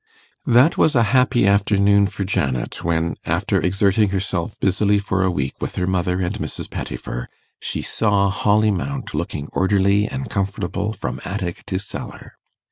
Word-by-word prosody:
That 125 +6 +5
was 155 - +4
a 120 - +5
happy 125 -3 +4
afternoon 100 0 +4
for 100 - -4
Janet, 65 -10 -2
when, 85 0 0
after - - 0
exerting 100 +2 +2
herself 95 0 -3
busily 100 +2 +2
for 100 -1 -1
a 95 - +2
week 70 -6 -2
with - - -4
her 90 - 0
mother 90 0 0
and 90 +2 -1
Mrs. - - -5
Pettifer, - - -5 0.3
she - - -3
saw 100 -3 +1
Holly 105 +2 +2
Mount 135 +8 -4
looking 75 -3 -3
orderly 100 +2 +2
and 130 +2 -5
comfortable 100 0 -2
from 110 - -5
attic 90 -3 -4
to 95 - -1
cellar. 100 +2 -8
100 Hz, 155 wpm, -21 LUFS, 90-105 Hz, 0.3 s, That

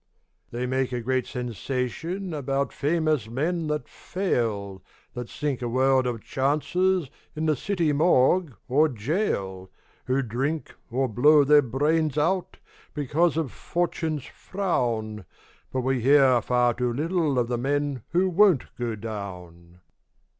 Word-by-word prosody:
They 120 +1 -3
make 130 0 -1
a 125 - -2
great 130 +2 -1
sensation 130 - -4
About 140 -1 -1
famous 155 -6 0
men 160 +7 -1
that 150 -4 -2
fail, 105 - -2 0.3
That 120 -1 -6
sink 150 -5 -3
a 120 - -2
world 130 +1 +2
of 115 -3 -4
chances 155 +4 0 0.2
In 155 +1 -2
the 155 -1 +2
city 170 0 0
morgue 155 0 +3
or 150 +5 +3
gaol, 105 - -2 0.4
Who 130 +2 +1
drink, 135 +7 -3 0.2
or 130 +2 0
blow 145 +6 +5
their 145 +1 +6
brains 150 +4 0
out, 180 +5 0 0.4
Because 155 +3 +1
of 160 -6 -1
"Fortune's 160 -4 -2
frown". 120 - -2 0.5
But 130 - -1
we 130 0 0
hear 135 -1 +5
far 125 +1 +2
too 125 +1 -1
little 155 +1 0
Of 120 -1 +2
the 120 -1 -2
men 140 0 -1
who 180 +3 +2
won't 185 -5 +3
go 120 -2 -2
down. 90 -5 -8
135 Hz, 135 wpm, -25 LUFS, 120-155 Hz, 0.5 s, their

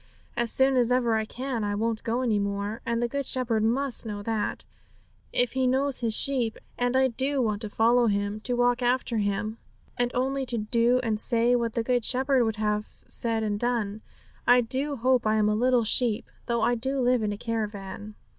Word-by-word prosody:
As 235 -1 +1
soon 265 0 +4
as 245 -1 +2
ever 245 -2 +2
I 220 0 0
can, 250 0 -4
I 205 0 -1
won't 225 +1 -2
go 235 +2 -1
any 220 -4 +1
more. 200 +2 -3
And 235 0 0
the - - +1
Good 280 +2 -3
Shepherd 235 -4 +1
must 250 +4 +1
know 205 -3 -6
that, 220 -1 -3 0.7
if 245 -1 +1
He 260 -1 +1
knows 270 +1 +1
His 230 -3 0
sheep. 250 -5 +2 0.2
And 245 +1 0
I 265 0 +4
do 265 +4 -1
want 215 -4 -1
to 215 - -1
follow 235 +3 +3
Him, 205 0 -1
to 245 +3 -2
walk 245 +1 +2
after 245 -2 0
Him, 210 +2 -2 0.4
and 245 0 +1
only 265 +2 0
say 240 - 0
and 215 0 -6
do 235 0 +2
what 230 -1 -2
the 230 - -1
Good 245 0 0
Shepherd 260 +1 +2
would 220 -1 -1
have 210 -1 -3
said 225 -1 +2
and 205 -1 -2
done. 220 -3 -2 0.5
I 245 0 +6
do 265 +5 -1
hope 255 -1 +1
I 215 - +2
am 215 -1 +2
a 210 - +2
little 245 +2 +2
sheep, 225 0 0 0.2
though 235 -1 0
I 240 - +2
do 265 +4 -2
live 250 -1 +2
in 210 -1 -1
a 205 - -4
caravan.' 210 -2 -5
235 Hz, 205 wpm, -26 LUFS, 215-250 Hz, 0.7 s, I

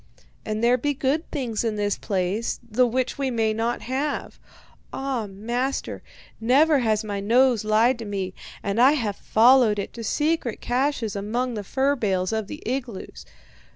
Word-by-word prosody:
And 215 +1 -3
there 245 +1 +4
be 290 +3 -1
good 285 +4 -1
things 245 -8 -2
in 225 -2 -1
this 205 -1 0
place, 195 +3 -2
the 245 +3 +3
which 255 +3 -2
we 275 -1 0
may 225 -3 +1
not 230 +2 -2
have. 275 +4 -3 0.5
Ah, 265 -5 -3
master, 235 +7 -3 0.4
never 280 +6 +4
has 220 -3 +1
my 205 -2 -3
nose 240 +2 +3
lied 225 +4 +3
to 225 - -6
me, 195 -3 -3 0.3
and 200 +4 0
I 265 +4 +7
have 225 -9 -1
followed 235 -1 +4
it 200 - -4
to 230 - -7
secret 295 +1 0
caches 250 -4 -1
and 200 +1 -4
among 245 +3 -1
the 210 -2 -4
fur 270 +7 +1
bales 190 -5 0
of 220 -2 -2
the - - -8
igloos. 245 -5 -5
235 Hz, 170 wpm, -24 LUFS, 215-260 Hz, 0.5 s, I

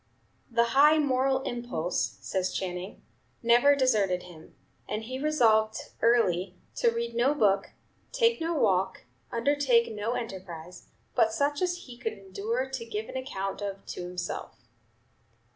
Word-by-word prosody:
"The 235 -1 +3
high 300 +3 +7
moral 265 -2 +2
impulse," 240 -10 -2
says 185 -1 -1
Channing, 180 0 -5 0.4
"never 240 +5 +6
deserted 210 -9 +2
him, 165 -3 -14 0.3
and 215 +1 -2
he 255 +3 -5
resolved 225 -8 +3 0.2
early 190 -6 +2 0.2
to 235 - +4
read 235 0 -3
no 250 +5 +2
book, 200 -7 +2 0.4
take 465 -5 +2
no 330 +1 0
walk, 190 -8 +1 0.3
undertake 245 -2 +2
no 210 +3 -2
enterprise, 180 -6 -7 0.3
but 225 -3 +3
such 285 +5 0
as 360 -1 +1
he 240 -2 -11
could 225 -3 -2
endure 210 +6 -3
to 265 -3 -5
give 220 -1 -5
an - - -8
account 195 -7 -4
of 195 -1 -5
to - - -6
himself." 180 0 -5
230 Hz, 140 wpm, -28 LUFS, 195-265 Hz, 0.4 s, high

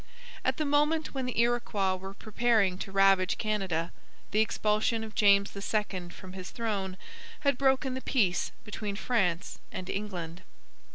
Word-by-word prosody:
At - - +1
the 310 - 0
moment 295 +2 +2
when 265 -2 -2
the 250 - -2
Iroquois 235 -5 +2
were 190 +1 -8
preparing 215 -4 +1
to 195 - -5
ravage 195 -1 +4
Canada, 190 -6 -1 0.4
the 210 - +2
expulsion 220 +1 +1
of 220 -1 -7
James 200 -1 +4
II 200 -3 -2
from 185 +1 -11
his 185 -1 -7
throne 200 -5 -3 0.4
had 280 -2 +3
broken 265 0 +2
the 260 - -4
peace 195 -11 +1
between 210 -1 -4
France 195 -7 0
and 185 - -5
England. 180 -4 -4
210 Hz, 150 wpm, -30 LUFS, 190-235 Hz, 0.4 s, ravage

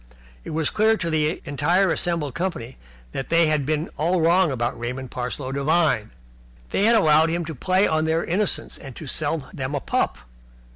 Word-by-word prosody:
It - - -8
was 155 -1 -1
clear 220 +1 +3
to 170 -5 -2
the 155 +1 0
entire 165 +7 +2
assembled 165 -6 -1
company 170 -9 -4 0.4
that 135 - -5
they 170 0 +4
had 150 -3 0
been 155 +1 -1
all 175 +4 +2
wrong 170 +2 +4
about 120 -3 -2
Raymond 125 +2 -5
Parsloe 130 +2 -4
Devine. 140 -4 +1 0.6
They 200 - +2
had 230 +1 +5
allowed 160 -4 +5
him 170 +1 -1
to 160 - -5
play 185 +8 +2
on 155 0 +1
their 160 +1 0
innocence 195 +4 -1
and 135 -4 -10
sell 145 0 -2
them 130 +1 -3
a - - 0
pup. - - -1
155 Hz, 180 wpm, -23 LUFS, 140-170 Hz, 0.6 s, had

